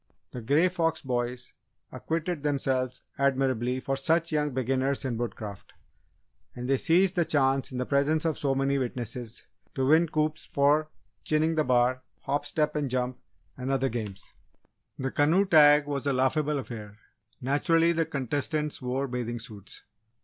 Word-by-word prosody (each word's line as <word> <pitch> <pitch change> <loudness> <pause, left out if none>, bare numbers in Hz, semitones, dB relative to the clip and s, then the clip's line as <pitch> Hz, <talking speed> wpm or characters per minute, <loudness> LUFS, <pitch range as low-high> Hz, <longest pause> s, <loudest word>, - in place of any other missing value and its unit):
The 125 - -6
Grey 145 +10 +3
Fox 165 -3 0
boys 125 -1 -3 0.4
acquitted 165 0 -3
themselves 130 -3 -1 0.2
admirably 130 -2 +1
for 135 +1 -2
such 165 +5 +1
young 150 -1 +1
beginners 130 +1 -1
in 125 -3 -1
Woodcraft, 110 -4 -6 0.8
and 125 0 -5
they 135 0 +3
seized 180 +6 +3
the 175 - +3
chance 135 -3 +1
in 130 - -5
the 125 - -1
presence 145 +4 +1
of 160 -2 +1
so 135 -2 0
many 135 +1 +1
witnesses 120 -2 -4 0.3
to 130 - 0
win 160 +4 +4
coups 155 0 -1
for 150 +2 +2 0.3
"chinning 155 +1 +1
the 155 -1 +2
bar," 125 0 +2 0.2
"hop, 145 +1 -1
step, 150 +1 0
and 145 -3 -1
jump" 125 0 -2 0.4
and 130 0 -5
other 135 0 +1
games. 105 -5 -5 0.6
The 130 0 -3
canoe 165 +7 +3
tag 150 -4 +6
was 145 -1 -3
a 140 - +2
laughable 145 +3 +1
affair 110 -6 -7 0.4
naturally, 165 +6 +2
the 165 -2 0
contestants 145 +2 -2
wore 130 +2 -2
bathing 120 -2 -3
suits. 110 -4 -10
135 Hz, 155 wpm, -28 LUFS, 125-150 Hz, 0.8 s, tag